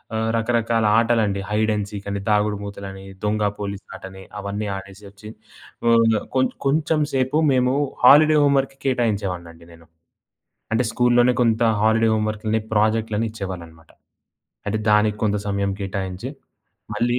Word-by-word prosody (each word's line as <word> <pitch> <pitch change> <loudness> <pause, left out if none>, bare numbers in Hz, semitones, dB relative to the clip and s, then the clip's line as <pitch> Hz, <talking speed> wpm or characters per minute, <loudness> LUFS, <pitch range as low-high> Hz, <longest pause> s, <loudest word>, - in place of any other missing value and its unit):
ఆహ్, 110 0 -1
రకరకాల 115 -1 +1
ఆటలండి, 110 -4 +1
hide 110 +1 +1
and 105 -1 -3
సీకని, 100 0 -5
దాగుడుమూతలని, 100 -2 -2 0.2
దొంగ 105 0 0 0.2
పోలీసాటని 95 -1 -8 0.2
అవన్నీ 100 +1 -4
ఆడేసొచ్చి, 100 +2 -12 0.6
ఓహ్, 115 -1 +4 0.2
కొంచ్ 130 0 +2
కొంచెం 150 +2 +1
సేపు 130 +3 +1
మేము, 125 0 +2 0.3
హాలిడే 150 +4 +7
హోమ్ 140 -1 +3
వర్క్‌కి 135 0 -5
కేటాయించేవాడినండి 95 -9 -2
నేను. 85 -1 -17 0.9
అంటే 120 +3 +2
స్కూల్‌లోనే 120 +1 +3
కొంత 115 -1 +2 0.2
హాలిడే 110 +1 +3
హోమ్ 110 0 0
వర్క్‌లని, 110 +1 -2
ప్రాజెక్ట్‌లని 110 +1 +1
ఇచ్చేవాళ్ళన్నమాట. 85 -6 -8 0.8
అంటే 105 +2 0
దానికి 105 0 +3
కొంత 105 -1 +1
సమయం 100 0 -1
కేటాయించి 95 -1 -4 0.7
మళ్ళీ 120 +1 0
110 Hz, 120 wpm, -22 LUFS, 100-120 Hz, 0.9 s, హాలిడే